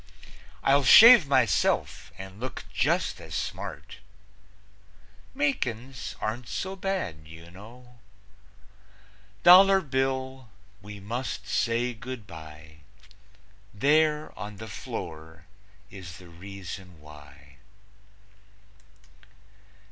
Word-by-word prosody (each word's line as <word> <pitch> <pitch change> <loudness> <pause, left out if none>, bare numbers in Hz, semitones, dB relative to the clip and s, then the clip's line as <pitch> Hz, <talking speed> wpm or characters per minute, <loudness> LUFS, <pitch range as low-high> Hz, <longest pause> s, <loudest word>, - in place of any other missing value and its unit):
I'll 140 +1 +3
shave 230 - +9
myself 140 - +1
and 95 +1 -10
look 130 +2 -7
just - - 0
as - - -8
smart. - - -6 1.4
Makin's 125 -4 -3
aren't 115 +2 -4
so 190 - -4
bad, 185 - -4
you 80 +1 -13
know. 120 +6 -15 1.4
Dollar 190 +2 +8
Bill, 130 -4 -3 0.3
we 105 -1 -10
must 120 +6 -5
say 120 +1 0
good 120 -1 -8
by; 80 -2 -13 1.0
There 150 +5 +2
on 105 0 -8
the 110 - -9
floor 80 -5 -8 0.5
is 90 -4 -10
the 90 -2 -15
Reason 90 0 -10
Why. 75 -2 -16
110 Hz, 85 wpm, -27 LUFS, 85-135 Hz, 1.4 s, shave